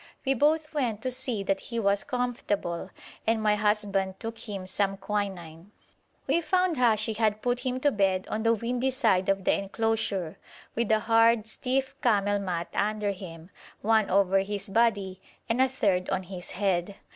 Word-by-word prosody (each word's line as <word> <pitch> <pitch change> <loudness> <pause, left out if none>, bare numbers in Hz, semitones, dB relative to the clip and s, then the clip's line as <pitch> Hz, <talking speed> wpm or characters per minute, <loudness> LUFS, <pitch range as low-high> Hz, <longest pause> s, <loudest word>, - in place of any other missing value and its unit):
We 270 - +3
both 305 +4 +1
went 235 -8 -1
to 255 - 0
see 250 -5 0
that 195 0 0
he 235 -1 -5
was 200 -2 +2
comfortable, 230 -9 -2 0.4
and 225 0 +3
my 215 -1 +3
husband 205 -2 0
took 225 0 -5
him 200 -4 -5
some 195 +1 -1
quinine. 190 -5 -4 0.6
We 340 - +2
found 365 +1 +1
Hashi 225 -3 +2
had 215 -1 0
put 245 0 +1
him 255 0 -2
to 290 - +3
bed 195 -4 +1
on 215 - -1
the 230 +1 +3
windy 245 +4 -1
side 220 -9 +2
of 195 -1 +1
the - - +3
enclosure, 195 -4 -1 0.3
with 230 -1 -1
a 215 0 +3
hard, 225 0 +4
stiff 260 +4 -2
camel 205 -3 +2
mat 175 -3 -3
under 210 0 0
him, 175 -3 -9 0.3
one 220 -1 +3
over 195 0 +3
his 200 0 -3
body, 200 -4 +1 0.3
and 235 +3 +1
a 260 - +4
third 195 -8 0
on 190 -1 -1
his 180 -1 -7
head. 195 0 -1
210 Hz, 170 wpm, -27 LUFS, 195-235 Hz, 0.6 s, hard